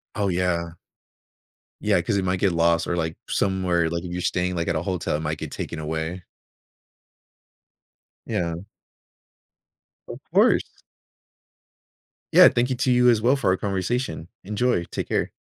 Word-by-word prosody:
Oh, 105 Hz, -2 st, 0 dB
yeah. 85 Hz, -2 st, -1 dB, 1.1 s
Yeah, -, -, +2 dB
'cause -, -, -1 dB
it 95 Hz, -, -1 dB
might 90 Hz, 0 st, 0 dB
get 95 Hz, -2 st, +2 dB
lost 85 Hz, 0 st, +2 dB
or, 85 Hz, -, -1 dB
like, 80 Hz, -1 st, -2 dB
somewhere, 90 Hz, -4 st, +1 dB
like, 85 Hz, +1 st, -3 dB
if 90 Hz, -, -6 dB
you're 90 Hz, 0 st, -3 dB
staying, 90 Hz, +1 st, -1 dB
like, 85 Hz, -1 st, -2 dB
at 85 Hz, -, 0 dB
a 80 Hz, -, 0 dB
hotel, 90 Hz, -4 st, -2 dB
it 75 Hz, -, -2 dB
might 80 Hz, 0 st, -3 dB
get -, -, -7 dB
taken -, -, -5 dB
away. 80 Hz, +3 st, -4 dB, 2.0 s
Yeah. 85 Hz, -2 st, -1 dB, 1.5 s
Of -, -, -7 dB
course. -, -, +4 dB, 1.7 s
Yeah, -, -, +9 dB
thank 120 Hz, +2 st, 0 dB
you 130 Hz, -, 0 dB
to 130 Hz, 0 st, +1 dB
you 125 Hz, 0 st, +5 dB
as 110 Hz, -2 st, +3 dB
well 125 Hz, +4 st, +4 dB
for 135 Hz, -, 0 dB
our 95 Hz, -, +1 dB
conversation. 100 Hz, 0 st, -2 dB, 0.2 s
Enjoy. 105 Hz, -1 st, 0 dB
Take -, -, -5 dB
care. -, -, 0 dB
90 Hz, 155 wpm, -24 LUFS, 85-100 Hz, 2.0 s, Yeah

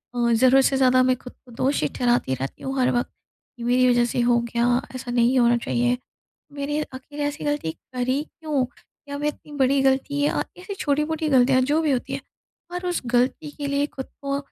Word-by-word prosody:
अ, 235 Hz, -1 st, +2 dB
ज़रूरत 260 Hz, +3 st, +5 dB
से 270 Hz, -, +2 dB
ज़्यादा 255 Hz, -1 st, +5 dB
मैं 255 Hz, 0 st, +3 dB
ख़ुद 250 Hz, 0 st, -12 dB
को 245 Hz, -, -15 dB
दोषी 255 Hz, -, 0 dB
ठहराती 240 Hz, -, +1 dB
रहती 135 Hz, +1 st, -5 dB
हूँ 270 Hz, 0 st, -3 dB
हर 250 Hz, -, +3 dB
वक़्त, 245 Hz, 0 st, 0 dB, 0.5 s
ये 235 Hz, -, -5 dB
मेरी 250 Hz, +1 st, +4 dB
वजह 240 Hz, -1 st, +4 dB
से -, -, -1 dB
हो 235 Hz, 0 st, +4 dB
गया, 235 Hz, +2 st, +1 dB
ऐसा 250 Hz, -1 st, -5 dB
नहीं 245 Hz, +2 st, +3 dB
होना 240 Hz, 0 st, +4 dB
चाहिए, 245 Hz, +1 st, 0 dB, 0.6 s
मेरे 295 Hz, +2 st, -2 dB
आख़िर 290 Hz, +3 st, -10 dB
ऐसी 290 Hz, +1 st, -5 dB
गलती 290 Hz, -, -1 dB
करी 255 Hz, -, -3 dB
क्यों? 305 Hz, -5 st, -2 dB, 0.4 s
या 285 Hz, -, -4 dB
मैं 295 Hz, +1 st, -1 dB
इतनी 300 Hz, 0 st, -6 dB
बड़ी 270 Hz, +1 st, +3 dB
ग़लती 270 Hz, +2 st, +1 dB
या 290 Hz, -, +1 dB, 0.2 s
ऐसी 375 Hz, +2 st, -6 dB
छोटी-मोटी 300 Hz, 0 st, 0 dB
गलतियाँ 260 Hz, -1 st, +4 dB
जो 310 Hz, +3 st, +2 dB
भी 305 Hz, -3 st, +1 dB
होती 250 Hz, -, -2 dB
हैं, -, -, -3 dB, 0.5 s
और 360 Hz, +1 st, -4 dB
उस 350 Hz, -, -1 dB
गलती 250 Hz, +5 st, 0 dB
के 285 Hz, -1 st, -3 dB
लिए 280 Hz, +1 st, +1 dB
ख़ुद 265 Hz, -2 st, -7 dB, 0.2 s
को 275 Hz, 0 st, -1 dB
260 Hz, 205 wpm, -24 LUFS, 245-290 Hz, 0.6 s, ज़रूरत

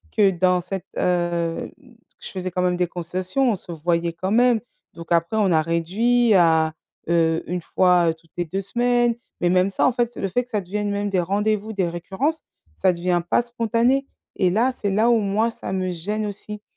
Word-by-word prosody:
que, 205 Hz, -3 st, +5 dB
dans 180 Hz, 0 st, +2 dB
cette, 180 Hz, +1 st, -6 dB
heu, 175 Hz, -2 st, 0 dB
mmh, 255 Hz, -4 st, -20 dB
que 235 Hz, -, -19 dB
je -, -, -5 dB
faisais 185 Hz, -1 st, -4 dB
quand 180 Hz, -, -1 dB
même 180 Hz, 0 st, +1 dB
des 180 Hz, 0 st, +1 dB
concessions. 185 Hz, +9 st, -1 dB
On -, -, 0 dB
se 175 Hz, -, -11 dB
voyait 170 Hz, +1 st, -1 dB
quand 185 Hz, +3 st, -3 dB
même. 240 Hz, 0 st, +4 dB, 0.3 s
Donc 170 Hz, 0 st, -11 dB
après, 170 Hz, +4 st, +2 dB
on 200 Hz, -4 st, +3 dB
a 160 Hz, -2 st, +4 dB
réduit 210 Hz, +9 st, +2 dB
à, 160 Hz, -3 st, +4 dB, 0.4 s
heu, 165 Hz, -1 st, +2 dB
1 180 Hz, +1 st, -3 dB
fois, 180 Hz, 0 st, +3 dB
heu, -, -, +1 dB
toutes 160 Hz, 0 st, -26 dB
les 175 Hz, -, -1 dB
2 190 Hz, +4 st, -3 dB
semaines, 240 Hz, +3 st, +1 dB, 0.3 s
mais 175 Hz, -, +3 dB
même 185 Hz, +2 st, +3 dB
ça, 195 Hz, -, +1 dB
en -, -, +4 dB
fait, 240 Hz, -1 st, 0 dB
c'est -, -, -8 dB
le 195 Hz, -, -1 dB
fait 245 Hz, +6 st, 0 dB
que -, -, -31 dB
ça 210 Hz, -3 st, -1 dB
devienne 205 Hz, +3 st, -3 dB
même 205 Hz, 0 st, -1 dB
des 190 Hz, -2 st, +1 dB
rendez-vous, 210 Hz, +4 st, 0 dB
des 190 Hz, -4 st, 0 dB
récurrences, 190 Hz, -, -2 dB, 0.4 s
ça 185 Hz, -, +2 dB
devient 175 Hz, 0 st, 0 dB
pas -, -, +3 dB
spontané 240 Hz, +3 st, +1 dB, 0.3 s
et 185 Hz, -2 st, +2 dB
là, 235 Hz, +7 st, +2 dB
c'est 205 Hz, -5 st, -3 dB
là 215 Hz, +4 st, +3 dB
où 235 Hz, -, +5 dB
moi 210 Hz, +2 st, +1 dB
ça 230 Hz, -, -7 dB
me 185 Hz, -1 st, -1 dB
gêne 210 Hz, +5 st, -3 dB
aussi 210 Hz, +1 st, -7 dB
190 Hz, 220 wpm, -22 LUFS, 175-220 Hz, 0.4 s, que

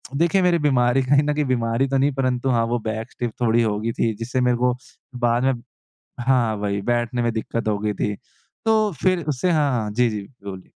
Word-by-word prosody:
देखिए, 170 Hz, +5 st, +2 dB
मेरी 175 Hz, -2 st, +3 dB
बीमारी 130 Hz, -3 st, +3 dB
कहीं 140 Hz, +3 st, +3 dB
न 150 Hz, 0 st, 0 dB
कहीं 150 Hz, -1 st, 0 dB
बीमारी 120 Hz, +1 st, 0 dB
तो 135 Hz, 0 st, 0 dB
नहीं, 140 Hz, +2 st, +2 dB
परंतु 130 Hz, -1 st, 0 dB
हाँ, 115 Hz, -2 st, +2 dB
वो 120 Hz, +1 st, -1 dB
बैक 110 Hz, +1 st, -4 dB
स्टिफ़ 120 Hz, -2 st, -4 dB
थोड़ी 115 Hz, 0 st, +3 dB
हो 105 Hz, -1 st, 0 dB
गई 115 Hz, +1 st, -1 dB
थी, 115 Hz, -1 st, 0 dB
जिससे 125 Hz, +2 st, -1 dB
मेरे 125 Hz, -1 st, +2 dB
को 125 Hz, 0 st, +1 dB, 0.5 s
बाद 120 Hz, +2 st, +2 dB
में 135 Hz, 0 st, +3 dB, 0.7 s
हाँ, 120 Hz, -3 st, +2 dB
वही 100 Hz, -1 st, -2 dB
बैठने 120 Hz, +1 st, 0 dB
में 120 Hz, -1 st, +1 dB
दिक्कत 110 Hz, 0 st, -3 dB
हो 105 Hz, -1 st, +1 dB
गई 105 Hz, 0 st, -1 dB
थी। 105 Hz, 0 st, -1 dB, 0.5 s
तो 215 Hz, -2 st, +3 dB
फिर 185 Hz, -4 st, +2 dB
उससे 150 Hz, +6 st, 0 dB
हाँ, 150 Hz, -4 st, +2 dB
हाँ। 110 Hz, -4 st, -1 dB
जी, 120 Hz, +2 st, +2 dB
जी, 105 Hz, -2 st, -4 dB
बिलकुल। 100 Hz, -5 st, -10 dB
120 Hz, 220 wpm, -22 LUFS, 115-135 Hz, 0.7 s, मेरी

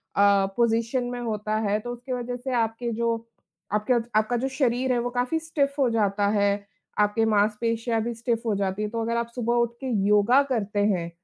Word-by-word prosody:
अ, 200 Hz, -1 st, +5 dB
position 235 Hz, +2 st, +1 dB
में 245 Hz, -, -4 dB
होता 215 Hz, -2 st, -2 dB
है 205 Hz, +1 st, +1 dB
तो 240 Hz, +3 st, -6 dB
उसकी 245 Hz, +2 st, -6 dB
वज़ह 245 Hz, 0 st, -3 dB
से 255 Hz, +1 st, -4 dB
आपके 230 Hz, +1 st, -1 dB
जो 230 Hz, +1 st, 0 dB, 0.6 s
आपके 210 Hz, +4 st, +2 dB, 0.3 s
आपका 220 Hz, +3 st, -1 dB
जो 260 Hz, +3 st, -1 dB
शरीर 260 Hz, -1 st, 0 dB
है, -, -, +1 dB
वो 240 Hz, +1 st, -1 dB
काफ़ी 245 Hz, +5 st, 0 dB
स्टिफ 300 Hz, -3 st, -1 dB
हो 265 Hz, -3 st, +3 dB
जाता 205 Hz, -3 st, +1 dB
है, 205 Hz, -1 st, +2 dB, 0.5 s
आपके 210 Hz, +2 st, +3 dB
माँसपेशियाँ 225 Hz, +2 st, +1 dB
भी 235 Hz, +1 st, -2 dB
स्टिफ 230 Hz, 0 st, -1 dB
हो 220 Hz, -3 st, +1 dB
जाती 195 Hz, 0 st, -1 dB
हैं, 210 Hz, 0 st, -2 dB
तो 230 Hz, 0 st, -2 dB
अगर 230 Hz, +1 st, -1 dB
आप 235 Hz, 0 st, -1 dB
सुबह 240 Hz, -1 st, 0 dB
उठ 235 Hz, -1 st, +2 dB
के 265 Hz, -, -4 dB, 0.2 s
योगा 210 Hz, +6 st, +5 dB
करते 210 Hz, -5 st, -1 dB
हैं, 180 Hz, -5 st, 0 dB
230 Hz, 205 wpm, -25 LUFS, 210-245 Hz, 0.6 s, अ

